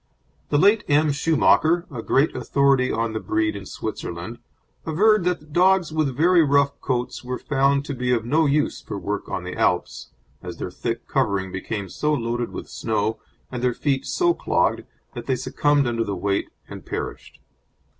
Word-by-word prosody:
The 145 - +2
late 205 +6 +4
M. 150 +1 +3
Schumacher, 160 +3 +3
a 120 -4 -5
great 135 +6 +2
authority 135 -2 +2
on 115 0 -1
the 110 - -2
breed 330 - 0
in - - -7
Switzerland, - - -6 0.4
averred 200 +4 +3
that 155 -4 -2
dogs 185 -2 +3
with 145 -5 0
very 170 +2 +5
rough 140 -1 +2
coats 125 -1 -2
were 125 0 -3
found 140 0 +1
to 145 - -4
be 125 -1 -1
of 115 -2 +1
no 155 +5 +2
use 145 +1 0
for - - -6
work 105 +1 -4
on 95 -2 -3
the 90 - -6
Alps, - - 0 0.3
as 90 -2 -7
their 90 - -5
thick 115 +5 -4
covering 100 -8 0
became 100 +2 -4
so 150 +10 0
loaded 120 -1 -2
with - - -7
snow 110 0 -2 0.3
and 125 -2 -4
their 125 -1 +1
feet 135 -1 -1
so 345 -1 +2
clogged - - 0 0.3
that - - -8
they 130 - +2
succumbed 145 +3 +1
under 115 -1 0
the 100 -3 -3
weight 100 +2 -1 0.2
and - - -9
perished. - - -6
135 Hz, 175 wpm, -23 LUFS, 115-155 Hz, 0.4 s, very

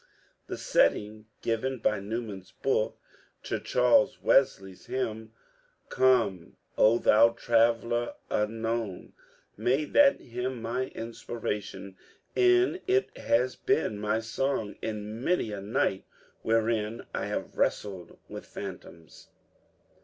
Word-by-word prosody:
The - - -5
setting 110 - +1 0.2
given 130 +3 -1
by 105 -3 +1
Newman's 105 -2 -5
book 120 -5 -1 0.4
to - - -2
Charles 125 +1 +3
Wesley's 95 -8 +1
hymn 110 -3 -3 0.3
— - - -37 0.2
"Come, 105 -9 +2 0.2
O 110 +2 +5
thou 115 0 +5
Traveller 115 0 +1 0.2
unknown" 110 -2 -2 0.2
— - - -33
made 140 +4 0
that 285 -1 +6
hymn 125 +1 -4
my 125 +3 -2
inspiration, 105 -4 -6 0.4
and 370 -1 +4
it 395 +1 +1
has 125 +2 +1
been 105 - 0
my 105 +2 0
song 115 -2 -2
in 110 +1 -5
many 175 -11 +1
a 100 -1 -5
night 100 -1 0 0.4
wherein 115 0 0
I - - -2
have - - -4
wrestled 95 -4 -1
with - - -9
phantoms. 85 -2 -10
115 Hz, 115 wpm, -28 LUFS, 105-125 Hz, 0.4 s, that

